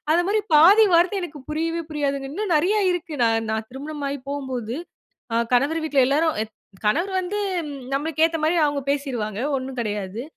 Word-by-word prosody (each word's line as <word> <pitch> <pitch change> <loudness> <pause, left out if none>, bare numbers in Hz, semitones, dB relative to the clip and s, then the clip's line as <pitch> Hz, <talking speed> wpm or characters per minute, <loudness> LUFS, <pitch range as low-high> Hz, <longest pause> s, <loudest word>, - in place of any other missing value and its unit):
அந்தமாரி 355 +6 +2
பாதி 385 +9 +8
வார்த்தை 350 +4 +4
எனக்கு 310 -4 -7
புரியவே 330 +2 -1
புரியாதுங்க, 280 -2 -2
இன்னும் 400 +2 -2
நிறைய 365 +8 +2
இருக்கு, 340 -3 -3
நான், 225 0 +1
நான் 220 0 -2
திருமணம் 290 +3 -6
ஆகி 280 +1 -3
போம்போது, 260 -4 -4 0.6
அ, - - +1 0.2
கணவர் 285 +7 +2
வீட்ல 285 -3 +2
எல்லாரும் 310 +4 +2
அ, - - -1 0.4
கணவர் 340 - +1
வந்து 370 +3 -3 0.6
நம்மளுக்கு 315 +2 +1
ஏத்தமாரி 325 +1 0
அவுங்க 290 -1 0
பேசிருவாங்க. 245 -7 -2 0.2
ஒன்னும் 260 -1 -5
கிடையாது, 205 -1 -3
290 Hz, 155 wpm, -23 LUFS, 260-330 Hz, 0.6 s, பாதி